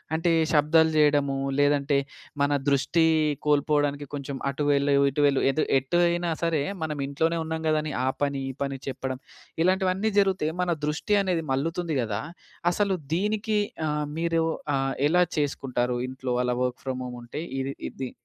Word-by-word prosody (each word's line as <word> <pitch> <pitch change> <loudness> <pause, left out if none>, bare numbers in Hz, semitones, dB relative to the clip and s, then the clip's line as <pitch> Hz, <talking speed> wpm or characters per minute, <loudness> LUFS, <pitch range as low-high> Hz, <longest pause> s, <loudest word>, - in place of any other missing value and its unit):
అంటే 165 +2 +1 0.2
శబ్దాలు 160 +1 +4
జేయడము, 145 -2 +3 0.2
లేదంటే 145 0 +3 0.4
మన 145 - +2 0.2
దృష్టి 155 +4 +3 0.4
కోల్పోడానికి 145 -1 +2
కొంచెం 140 -1 -4
"అటు 140 +2 -3
వెళ్ళు, 140 0 +3 0.2
ఇటు 145 - -2
వెళ్ళు" 140 -1 +2
ఏదో 155 - 0 0.2
ఎటు 135 +6 -1
అయినా 175 0 -1
సరే, 165 -3 +1 0.2
మనమింట్లోనే 150 +2 -1
ఉన్నాం 160 0 -4
గదాని 155 -1 0
ఆ - - +3
పని 140 -1 0
ఈ - - -4
పని 135 -1 -4
చెప్పడం 130 -1 -4 0.4
ఇలాంటివన్నీ 190 +3 +2
జరుగుతే, 190 -5 +1
మన 180 - 0 0.2
దృష్టి 165 +8 0
అనేది 180 -4 -1
మల్లుతుంది 165 +3 -1
గదా! 105 -2 -2 0.5
అసలు 200 0 +1 0.2
దీనికి 210 +3 0 0.3
అహ్, 150 0 -1
మీరు 165 -1 +1 0.3
అహ్, 135 0 0
ఎలా 180 +3 +4
చేసుకుంటారు? 125 -4 -1
ఇంట్లో 130 -1 -3
అలా 125 0 0
వర్క్ 125 -1 -3
ఫ్రామ్ 130 -1 -3
హోమ్ 125 0 -7
ఉంటే 120 +5 -6 0.2
ఇది 135 +1 -3 0.2
ఇది. 130 -2 -6
150 Hz, 150 wpm, -26 LUFS, 135-165 Hz, 0.5 s, శబ్దాలు